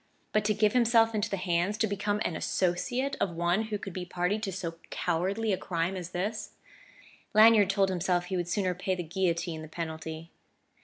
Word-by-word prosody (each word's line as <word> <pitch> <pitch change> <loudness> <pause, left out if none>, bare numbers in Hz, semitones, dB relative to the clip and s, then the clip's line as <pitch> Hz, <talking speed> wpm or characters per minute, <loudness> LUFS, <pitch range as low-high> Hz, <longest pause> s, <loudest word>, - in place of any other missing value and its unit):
But 215 - +2
to 215 0 +2
give 210 0 +3
himself 230 -2 +4
into 210 -1 0
the 195 - -2
hands, 180 +2 0
to 220 - +2
become 205 0 -1
an 165 - -1
associate, 245 - 0
of 175 -4 0
one 175 +6 +1
who 215 -1 -3
could 195 -2 -7
be 185 - -4
party 180 +3 -1
to 205 -3 -3
so 170 -3 -5
cowardly 190 +5 0
a - - 0
Crime 170 +1 -2
as 180 -2 -5
this... 200 +5 -3 0.8
Lanyard 215 -2 +7
told 195 -1 +2
himself 180 -1 0
he 185 - -3
would 175 -1 -1
sooner 185 -1 0
pay 185 +1 -2
the 180 - -4
guillotine 170 -1 -1
the 155 - -8
penalty.... 160 0 -6
185 Hz, 195 wpm, -29 LUFS, 175-210 Hz, 0.8 s, Lanyard